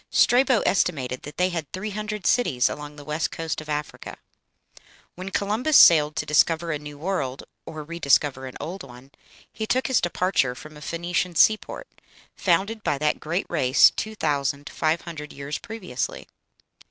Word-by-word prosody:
Strabo 255 Hz, -1 st, +4 dB
estimated 135 Hz, -9 st, 0 dB
that 150 Hz, +1 st, -10 dB
they 180 Hz, +1 st, +2 dB
had 165 Hz, -6 st, -5 dB
three 210 Hz, +3 st, -4 dB
hundred 210 Hz, -1 st, -5 dB
cities 130 Hz, -, +2 dB
along 150 Hz, 0 st, -7 dB
the 145 Hz, -, -11 dB
west 150 Hz, +2 st, -1 dB
coast 165 Hz, -1 st, -4 dB
of 155 Hz, -, -12 dB
Africa. 150 Hz, 0 st, -5 dB, 1.0 s
When 185 Hz, +2 st, -7 dB
Columbus 220 Hz, +10 st, +2 dB
sailed 150 Hz, -2 st, +7 dB
to -, -, -2 dB
discover 165 Hz, +2 st, +2 dB
a 150 Hz, -, -2 dB
new 145 Hz, 0 st, -10 dB
world, 145 Hz, -6 st, -3 dB, 0.2 s
or 155 Hz, -1 st, -7 dB
re 170 Hz, +3 st, -8 dB
discover 140 Hz, -3 st, +2 dB
an 130 Hz, -, -9 dB
old 185 Hz, +5 st, -6 dB
one, 130 Hz, +1 st, -13 dB, 0.4 s
he 220 Hz, -, -4 dB
took 255 Hz, +3 st, +1 dB
his 260 Hz, -3 st, +2 dB
departure 175 Hz, -7 st, 0 dB
from 155 Hz, +4 st, -12 dB
a 150 Hz, -, -12 dB
Phoenician 170 Hz, +3 st, -2 dB
seaport, 220 Hz, -, +2 dB, 0.5 s
founded 200 Hz, +4 st, +1 dB
by 140 Hz, -, 0 dB
that 150 Hz, +1 st, 0 dB
great 170 Hz, +5 st, -2 dB
race 130 Hz, -6 st, +5 dB
two 220 Hz, 0 st, -5 dB
thousand 145 Hz, -4 st, -1 dB
five 160 Hz, +1 st, 0 dB
hundred 155 Hz, -3 st, -8 dB
years 140 Hz, +1 st, -5 dB
previously. 190 Hz, -, -5 dB
160 Hz, 165 wpm, -24 LUFS, 145-195 Hz, 1.0 s, sailed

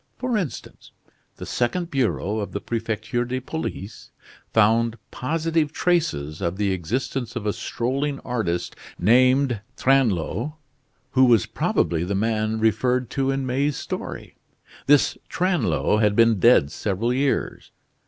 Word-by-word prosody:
For 255 Hz, -2 st, -1 dB
instance, 185 Hz, -10 st, -5 dB, 0.4 s
the -, -, -8 dB
second 170 Hz, +8 st, -1 dB
bureau 110 Hz, -5 st, 0 dB
of 100 Hz, -, -5 dB
the 100 Hz, -, -2 dB
Prefecture 115 Hz, +1 st, -2 dB
de 125 Hz, +1 st, -3 dB
Police 130 Hz, -7 st, -6 dB, 0.4 s
found 115 Hz, +1 st, +3 dB
positive 160 Hz, +2 st, -1 dB
traces 150 Hz, -, 0 dB
of 85 Hz, 0 st, -2 dB
the 100 Hz, -1 st, +1 dB
existence 120 Hz, +7 st, -3 dB
of 115 Hz, -3 st, -4 dB
a 105 Hz, -, +1 dB
strolling 135 Hz, +4 st, -2 dB
artist, 110 Hz, -9 st, -2 dB, 0.2 s
named 125 Hz, +2 st, +3 dB, 0.2 s
Tringlot, 130 Hz, -, +1 dB, 0.6 s
who 130 Hz, 0 st, +5 dB
was 115 Hz, -6 st, +4 dB
probably 85 Hz, -1 st, 0 dB
the 95 Hz, +3 st, -2 dB
man 110 Hz, +1 st, 0 dB
referred 120 Hz, +3 st, +1 dB
to 135 Hz, -1 st, 0 dB
in 135 Hz, 0 st, -1 dB
May's 135 Hz, +3 st, 0 dB
story. -, -, -6 dB, 0.5 s
This 145 Hz, 0 st, +4 dB
Tringlot 105 Hz, -, +1 dB
had 105 Hz, -1 st, +3 dB
been 115 Hz, -2 st, +4 dB
dead 90 Hz, -, +5 dB
several 110 Hz, +4 st, -1 dB
years. 135 Hz, +1 st, -1 dB
120 Hz, 130 wpm, -23 LUFS, 105-135 Hz, 0.6 s, who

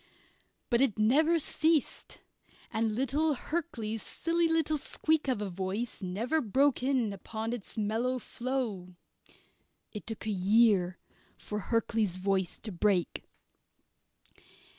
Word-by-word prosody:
But 235 Hz, +1 st, +4 dB
it 260 Hz, -7 st, +2 dB
never 300 Hz, +10 st, +4 dB
ceased, 315 Hz, -1 st, 0 dB, 0.5 s
and 220 Hz, -1 st, 0 dB
little 280 Hz, +5 st, +1 dB
Hurkley's 240 Hz, -8 st, -3 dB
silly 335 Hz, 0 st, 0 dB
little 320 Hz, -2 st, +1 dB
squeak 315 Hz, +1 st, 0 dB
of 245 Hz, -6 st, 0 dB
a 200 Hz, -, -3 dB
voice 195 Hz, +7 st, -3 dB
never 220 Hz, +12 st, 0 dB
broke 270 Hz, +4 st, +2 dB
in 255 Hz, -5 st, +1 dB
upon 220 Hz, +3 st, -4 dB
its 240 Hz, -1 st, -8 dB
mellow 225 Hz, +4 st, 0 dB
flow. 235 Hz, -8 st, -4 dB, 1.0 s
(It 210 Hz, -, -8 dB
took 225 Hz, -1 st, -5 dB
a 220 Hz, -, 0 dB
year 195 Hz, -2 st, +3 dB, 0.4 s
for 210 Hz, -2 st, -5 dB
Hurkley's 225 Hz, -5 st, +1 dB
voice 190 Hz, -1 st, 0 dB
to 215 Hz, -, -4 dB
break.) 185 Hz, -1 st, 0 dB
225 Hz, 120 wpm, -30 LUFS, 205-275 Hz, 1.0 s, But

